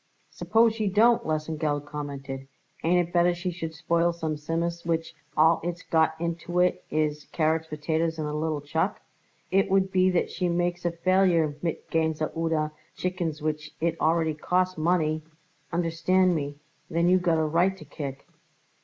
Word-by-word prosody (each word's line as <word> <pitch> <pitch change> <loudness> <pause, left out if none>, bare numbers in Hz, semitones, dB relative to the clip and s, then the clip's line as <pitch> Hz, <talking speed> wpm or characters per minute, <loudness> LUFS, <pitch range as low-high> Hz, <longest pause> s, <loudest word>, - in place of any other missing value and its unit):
"Suppose 225 0 +3
she 220 -2 -1
don't," 230 +4 +4
Lesengeld 155 -2 -1
commented. 140 -2 -6 0.4
"Ain't 175 +1 +3
it - - -20
better 175 0 +4
she 175 +1 -3
should 165 -2 -6
spoil 170 +2 +1
some 160 -2 -3
Tzimmus 170 +3 -2
which 165 -1 -1 0.2
all 160 +2 +5
it's 175 0 -4
got 160 -1 +2
into 170 +1 -3
it 180 0 +2
is 150 -1 -1
carrots, 160 0 +1
potatoes, 160 +2 -1
and 155 -1 -2
a 150 - -3
little 155 -1 -1
chuck? 160 +6 -1 0.5
If 195 +1 +4
it 195 - -8
would 190 0 +3
be 185 0 +4
that 180 -2 0
she 180 -2 -1
makes 175 0 -1
a 175 - +2
failure 170 -3 +2
mit 170 -2 -3
Gänse 160 -1 0
oder 160 -2 0 0.2
chickens 170 -4 -3
which 155 0 -3
it 165 0 0
really 160 -1 +2
costs 185 +4 0
money, 155 -1 +1 0.5
understand 175 +2 +2
me, 145 -3 -2 0.3
then 170 +1 +1
you 185 +1 +5
got 170 -2 +2
a 160 - +2
right 175 +5 +2
to - - -12
kick." 140 -3 -6
165 Hz, 170 wpm, -27 LUFS, 155-175 Hz, 0.5 s, all